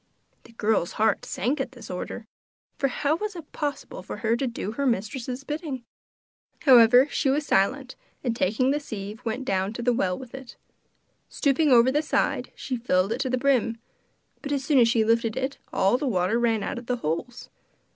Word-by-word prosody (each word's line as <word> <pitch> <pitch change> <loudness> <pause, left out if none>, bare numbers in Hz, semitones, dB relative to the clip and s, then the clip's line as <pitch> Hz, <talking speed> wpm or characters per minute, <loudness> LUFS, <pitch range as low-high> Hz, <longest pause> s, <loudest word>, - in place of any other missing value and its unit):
The - - -15
girl's 215 -6 0
heart 220 -1 +1
sank 265 +7 -1
at 265 -1 -5
this 230 -5 -10
order; 180 +5 -5 0.5
for 275 - +1
how 285 +4 0
was 420 +1 -4
it 330 -4 -10
possible 290 -2 -4
for - - -7
her 225 +1 +3
to 260 +2 -1
do 230 -3 -4
her 280 +5 -1
mistress's 245 +4 -2
bidding? 295 -3 -5 0.8
However, 250 0 +7
she 275 - +1
was 285 +2 +1
silent, 255 +7 +1 0.3
and 240 -3 -1
taking 230 +6 +1
the 295 - +1
sieve 215 -5 -7
went 245 +3 -3
down 195 -1 0
to 235 - -5
the 245 0 +3
well 185 -5 0
with 255 -3 -11
it. 265 -2 -10 0.7
Stopping 290 +1 +2
over 245 0 +6
the 295 +2 +2
side, 310 - -1
she 255 - -4
filled 195 -4 +1
it 235 - -1
to 265 -1 -1
the 255 - +1
brim, 245 -4 +1 0.6
but 290 - -5
as 275 -2 -1
soon 290 -2 +4
as 235 - +6
she 230 -1 +2
lifted 230 0 +1
it 265 +1 -3
the 245 +9 +2
water 185 -2 +1
all 240 - +1
ran 225 -3 +1
out - - -3
of 240 - -14
the 250 - +1
holes. 235 +6 -4
245 Hz, 195 wpm, -25 LUFS, 225-275 Hz, 0.8 s, However